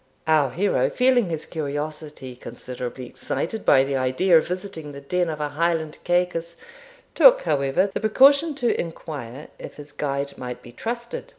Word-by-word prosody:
Our 155 -4 +3
hero, 190 +10 +1
feeling 250 -5 +3
his 160 -2 -3
curiosity 150 -3 -5
considerably 125 0 -7
excited 195 - -4
by 135 -1 +5
the 135 0 -1
idea 130 +8 +2
of 160 - +4
visiting 180 -5 -6
the 140 - -8
den 175 +4 0
of 155 -1 -4
a 150 -1 -2
Highland 160 0 -1
Cacus, 175 -1 0 0.6
took, - - +7
however, 140 - +1
the - - -1
precaution 280 +7 +5
to 245 -4 +1
inquire 150 -5 -7
if - - -9
his 145 0 -11
guide 140 -1 -3
might 125 -1 -6
be 120 - -12
trusted. 235 - -5
155 Hz, 160 wpm, -23 LUFS, 140-185 Hz, 0.6 s, took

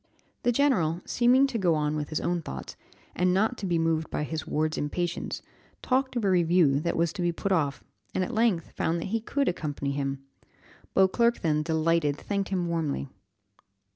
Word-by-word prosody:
The 245 - +2
general, 215 - +2
seeming 250 +3 +4
to 260 -4 -2
go 175 -4 +3
on 150 0 0
with 150 -1 -3
his 155 - -1
own 175 -1 -1
thoughts, 65 - -7 0.4
and 180 +1 +2
not 220 +5 +2
to 195 - -3
be 175 -1 +1
moved 165 -1 0
by - - -2
his 155 0 -4
ward's 155 +1 0
impatience, 175 +4 -3 0.4
talked 260 0 +1
of 235 -4 0
a - - +3
review 170 -5 +4
that 170 +3 -1
was 170 0 +1
to 200 - -4
be 175 0 +2
put 195 +4 -3
off, 145 -6 0 0.3
and 185 - +2
at 240 - -4
length 220 -8 +1
found 170 +1 -1
that 165 - -4
he 225 - +1
could 280 +5 -1
accompany 145 -4 -2
him. 135 -1 -3 0.7
Beauclerc 235 +5 +3
then, 155 -2 +1
delighted, 160 -2 +1
thanked 200 +2 -2
him 185 -2 0
warmly. 155 -5 -2
170 Hz, 190 wpm, -27 LUFS, 155-200 Hz, 0.7 s, seeming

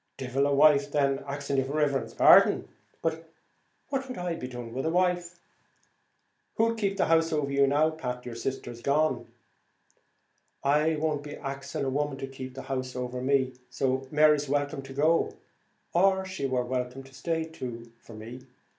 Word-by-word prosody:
"Devil 135 +2 0
a - - 0
wife, 145 -1 +5
then, 140 -2 +1
axing 140 0 -2
your 135 0 +1
riverence's 140 -2 0
pardon. - - +6 0.3
What'd 165 - -6
I 175 -1 -2
be 165 -6 -5
doing 120 -2 -7
with 135 +5 -2
a - - +2
wife?" 175 0 0 1.2
"Who'll 230 +1 +2
keep 200 -3 -1
the - - +3
house 165 0 +3
over 150 -3 0
you 140 0 +4
now, 150 +3 +3
Pat, 125 -5 -5
your 120 - -6
sister's 120 0 -5
as - - -15
good 140 - 0
as - - +2
gone?" 140 -6 +1 1.4
"I 150 +3 +3
won't 150 -1 -1
be 145 0 -8
axing 140 -1 -4
a 135 - -1
woman 145 0 -1
to 135 - -4
keep 130 -1 -8
the 135 - -7
house 130 -1 -4
over 125 0 -4
me; 130 -1 +2 0.2
so 130 +1 -1
Mary's 150 -1 +4
welcome 145 0 -1
to 135 0 -10
go; 155 +4 +2 0.6
or, 190 +2 +3
she 185 -7 -3
wor 130 -1 0
welcome 125 +1 -3
to 135 0 -17
stay, 165 +3 -2
too, 120 -7 -7
for 115 - -13
me. 120 +4 -10
140 Hz, 175 wpm, -28 LUFS, 130-160 Hz, 1.4 s, pardon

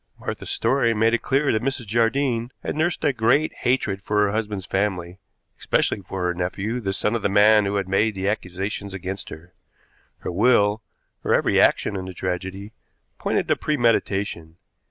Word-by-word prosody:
Martha's - - -5
story 120 -4 +1
made 115 +2 +3
it 120 - +1
clear 140 +2 +1
that 110 - 0
Mrs. 130 -1 -2
Jardine 115 +2 +1
had - - -3
nursed 160 +2 0
a 145 -3 +3
great 125 +6 +2
hatred 110 -6 0
for 105 +1 +1
her 100 - +1
husband's 105 -3 -3
family, 95 -3 -2 0.4
especially 100 - 0
for 95 -1 -5
her 90 0 +1
nephew, 95 +6 -3
the 95 -3 -1
son 105 +2 -1
of 115 - -1
the - - +1
man 105 +1 +5
who 100 +1 -1
had 100 -2 -1
made 105 +3 +1
the 95 0 -2
accusations 100 0 -3
against 95 +1 -6
her. 85 +3 -11 0.7
Her - - -4
will, 105 +1 +3 0.4
her - - +2
every - - +3
action 100 - +2
in 95 -1 -4
the 95 -1 -8
tragedy, 95 +4 -4 0.5
pointed - - 0
to - - +4
premeditation. 100 - 0
105 Hz, 175 wpm, -23 LUFS, 95-115 Hz, 0.7 s, man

